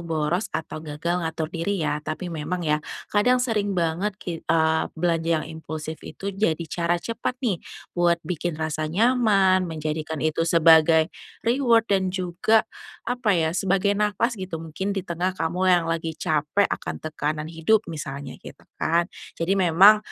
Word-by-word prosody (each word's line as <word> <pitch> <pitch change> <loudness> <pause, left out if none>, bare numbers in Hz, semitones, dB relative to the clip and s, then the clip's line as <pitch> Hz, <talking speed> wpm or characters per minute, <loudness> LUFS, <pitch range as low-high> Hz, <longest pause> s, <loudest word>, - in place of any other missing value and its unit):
boros 165 +3 -1
atau 155 0 -5
gagal 160 +3 -2
ngatur 160 0 -3
diri 175 0 -1
ya, 150 - -1
tapi 155 +3 -5
memang 165 +3 -3
ya 150 0 +1 0.3
kadang 230 +5 +4
sering 215 -6 0
banget 175 +4 0
ki 170 -3 -6
eee, 160 -1 +2
belanja 165 -1 0
yang 155 - -3 0.2
impulsif 155 0 -6
itu 200 0 -6
jadi 170 -5 0
cara 170 +2 0
cepat 230 +7 -4
nih, 195 -8 0 0.3
buat 175 -1 +3
bikin 175 -2 -3
rasa 155 -1 -2
nyaman, 195 -3 +3
menjadikan 155 0 -3
itu 165 +1 +1
sebagai 160 0 +5 0.3
reward 235 -2 +3
dan 190 -1 +2
juga, 185 +4 +1 0.4
apa 240 -5 +1
ya, 160 -1 +1
sebagai 195 +2 +1
e 205 - -3
nafas, 210 +4 +1
gitu. 165 - -5
Mungkin 190 +5 -3
di 195 - -2
tengah 180 +1 -2
kamu 180 +2 -1
yang 175 -2 +4
lagi 165 -1 -2
capek 160 +3 +1
akan - - -4
tekanan 155 0 -3
hidup, 170 +7 +2
misalnya, 140 -3 -6
gitu - - -13 0.2
kan. 170 +2 +1 0.2
Jadi 185 +4 0
memang, 190 +4 +7
170 Hz, 160 wpm, -24 LUFS, 160-195 Hz, 0.4 s, memang